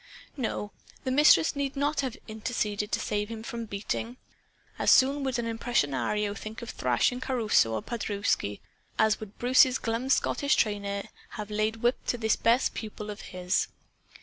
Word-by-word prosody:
No, 220 -5 -3 0.3
the 260 - -1
Mistress 260 - +5
need 280 -1 -2
not 285 +1 +1
have 260 -4 -4
interceded 215 -2 -2
to - - +1
save 210 0 -2
him 225 -1 -6
from 235 -1 -5
beating. 220 +3 -4 0.6
As - - +2
soon 275 +2 +5
would 260 -2 -1
an 235 - -2
impresario 210 - 0
think 215 +3 -8
of 235 - -6
thrashing 125 - +1
Caruso 225 - +2
or 110 - -3
Paderewski 205 - -1 0.4
as 220 0 +3
would 215 -2 -10
Bruce's 255 +1 +5
glum 230 +3 -2
Scottish 280 +1 +2
trainer 200 -1 0 0.3
have 210 -1 -6
laid 215 +2 -1
whip 240 +2 +2
to 245 - +1
this 220 -2 +2
best 235 +3 +2
pupil 210 -1 -6
of 205 - -8
his. 180 0 0
220 Hz, 160 wpm, -28 LUFS, 205-250 Hz, 0.6 s, Mistress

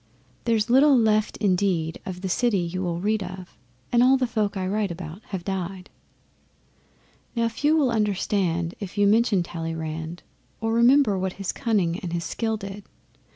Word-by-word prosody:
There's 225 -3 +2
little 270 +3 +6
left 215 -2 +2
indeed 180 -5 0
of 180 -1 -6
the 190 - -3
city 230 +3 +1
you 180 +1 -2
will 170 -2 -2
read 210 +3 0
of, 185 -1 -8 0.4
And 240 - +4
all 260 +2 +6
the 260 - +1
folk 210 -4 -1
I 185 - -2
write 205 +1 0
about 170 +2 -7
have 190 -3 -5
died. 190 -1 -4 1.4
Now 230 -1 +2
few 295 +7 +1
will 275 -5 +2
understand 195 -5 0
if 200 0 -7
you 205 - +4
mention 210 -2 +3
Talleyrand, 165 0 -5 0.4
Or 225 0 -1
remember 235 -3 +4
what 185 0 -2
his 195 -2 -3
cunning 190 -7 0
and 175 -2 -5
his 170 -1 -2
skill 220 +5 -2
did. 200 0 -8
195 Hz, 165 wpm, -25 LUFS, 175-225 Hz, 1.4 s, little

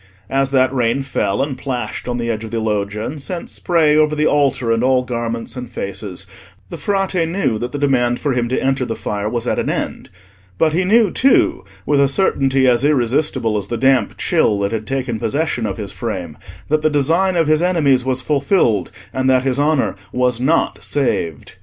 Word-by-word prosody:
As 135 0 +1
that 130 -1 +2
rain 125 +1 +1
fell, 100 -5 -1
and 140 -1 -3
plashed 125 -4 -4
on 120 -1 -2
the 115 -1 -1
edge 110 0 -4
of 110 - -6
the 115 +1 -2
Loggia, 105 0 -2
and 145 +4 -5
sent 175 +4 -5
spray 160 -4 +2
over 155 0 +3
the 150 0 +1
altar 135 -6 +2
and 115 +1 +1
all 130 0 +3
garments 115 -1 -4
and 125 -1 -6
faces, 100 -1 -5 0.4
the - - -6
Frate 195 -4 0
knew 165 - -1
that 120 +2 -4
the 145 - -4
demand 125 -4 +1
for 145 -3 -1
him 120 -1 0
to 130 - 0
enter 135 -1 0
the 115 -2 -3
fire 105 0 -3
was 120 0 -3
at - - 0
an - - -1
end. - - -3 0.5
But 155 -1 +2
he 180 +3 +1
knew 215 0 +4
too, 265 - +2 0.2
with 145 -1 +3
a 140 - +4
certainty 135 -4 +2
as 120 0 +3
irresistible 125 -5 +1
as 100 -2 -4
the 120 - -3
damp 130 -3 +2
chill 105 - +2
that 100 - 0
had 110 -1 -4
taken 130 -3 -2
possession 120 0 -1
of 95 - -4
his 100 -3 -5
frame, 90 -9 -5 0.3
that 155 +1 +1
the 155 - +2
design 165 +6 +1
of 165 -1 +3
his 155 +1 +2
enemies 150 -8 +2
was 130 -1 -1
fulfilled, 140 - +1 0.2
and 130 0 0
that 130 -1 +3
his 135 0 0
honour 145 -9 +1 0.2
was 125 -1 +1
not 150 +6 +1
saved. 85 - -2
130 Hz, 205 wpm, -18 LUFS, 115-150 Hz, 0.5 s, knew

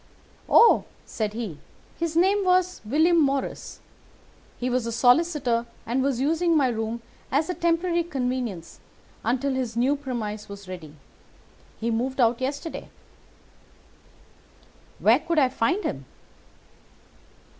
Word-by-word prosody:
"'Oh,' 465 - +6 0.2
said 215 -2 -3
he, 215 -10 -5 0.4
'his 335 -1 -2
name 390 +3 +3
was 365 0 +2
William 320 +9 +3
Morris. 275 -2 -2 0.8
He 250 - -3
was 250 -2 0
a - - -2
solicitor 245 -1 +2 0.2
and 245 +3 0
was 265 -2 0
using 325 +4 +2
my 270 -3 +3
room 225 0 -3 0.3
as 305 +6 +1
a - - -2
temporary 340 0 +1
convenience 250 - -4 0.4
until 260 +4 0
his 250 -3 -3
new 260 +4 +3
premises 220 -7 -5 0.2
were 185 - -9
ready. 160 -4 -10 0.8
He 230 +2 -1
moved 255 +4 -2
out 235 0 +3
yesterday.' 285 +5 -4 2.1
"'Where 230 +5 +4
could 335 +1 -2
I 270 -4 +5
find 260 - 0
him? 135 -1 -4
260 Hz, 125 wpm, -25 LUFS, 230-325 Hz, 2.1 s, Oh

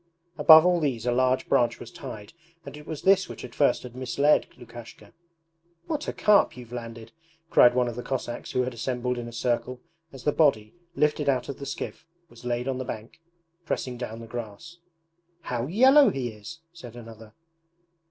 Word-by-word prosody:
Above 160 0 +8
all 180 -1 +3
these 130 -7 -2
a 125 - +1
large 130 +1 +1
branch 120 0 +2
was 120 - -10
tied, 120 -3 -9 0.3
and - - -9
it 150 0 -13
was 155 - -6
this 195 0 +4
which - - -8
at 120 - -12
first 140 - +2
had 125 -1 -10
misled 140 +4 +2
Lukashka. 115 -3 -13 0.7
'What 305 -2 -4
a - - -1
carp 210 -10 +3
you've 120 -2 -11
landed!' 115 -2 -8 0.4
cried 120 0 +6
one 125 -1 +2
of 120 - -5
the 125 - -5
Cossacks 120 -2 -5
who 125 - +1
had 125 0 -4
assembled 125 +1 -3
in 120 - -6
a - - -8
circle, 125 +1 -2 0.3
as 135 -2 -12
the 150 - +2
body, 125 -10 +2 0.2
lifted 150 -1 +1
out 130 0 0
of 140 - -6
the 140 - -7
skiff, - - -6 0.2
was 120 -3 -16
laid 120 +1 -2
on 130 -1 -2
the - - -3
bank, 115 +5 -8 0.4
pressing 125 -5 -3
down 115 -2 -7
the - - -9
grass. 120 +9 -8 0.6
'How 125 -4 -3
yellow 260 - +6
he 130 -3 -3
is!' 110 +10 -11
said 125 -9 -11
another. 115 -2 -12
125 Hz, 190 wpm, -26 LUFS, 120-145 Hz, 0.7 s, Above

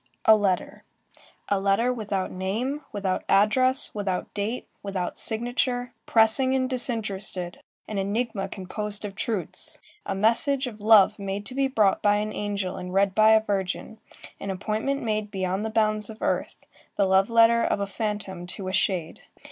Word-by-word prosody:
A 220 - +8
letter. 195 -4 -1 0.6
A 200 - +1
letter 200 +6 +2
without 205 -5 -3
name, 225 +10 -2
without 195 -3 -2
address, 255 +7 +3
without 195 -3 -3
date, 215 +4 -3
without 190 -3 -3
signature, 245 +2 -1
pressing 230 +4 +5
and 260 -1 +1
disinterested, 205 -8 -1 0.3
an 210 -2 -3
enigma 205 +1 -2
composed 210 +2 -4
of 200 - -6
truths, 200 -1 -4 0.3
a 195 - -1
message 235 +7 +2
of 220 -4 -8
love 210 -1 +6
made 200 +1 -4
to 250 - -7
be 270 +1 +1
brought 215 -7 +2
by 205 -1 +4
an 210 +1 -2
angel 200 -3 -3
and 180 +1 -6
read 195 0 +3
by 215 +2 +6
a 220 0 +4
virgin, 200 +1 -3 0.4
an 200 - -5
appointment 215 +8 -2
made 215 -2 -1
beyond 190 0 -2
the 220 - -2
bounds 215 -1 0
of 220 0 -9
earth, - - -2 0.3
the 200 - +2
love 190 +2 +3
letter 230 0 +5
of - - 0
a 200 - 0
phantom 200 -3 -4
to 185 +1 -6
a 185 - -3
shade. 185 -5 -1
210 Hz, 165 wpm, -25 LUFS, 195-230 Hz, 0.6 s, A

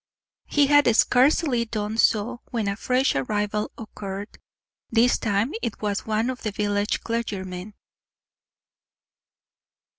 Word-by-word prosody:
He 290 -1 +3
had 290 +1 +5
scarcely 255 +1 +3
done 220 -1 -3
so 230 +3 +2
when 225 -4 -2
a 200 - -1
fresh 255 +5 +1
arrival 210 +9 -1
occurred. 205 -2 -7 0.5
This 235 +2 +3
time 210 +4 0
it 225 - -4
was 205 -1 -2
one 220 +3 0
of 255 - -8
the 215 - -2
village 205 0 -1
clergymen. 200 -4 -4
215 Hz, 115 wpm, -24 LUFS, 205-245 Hz, 0.5 s, had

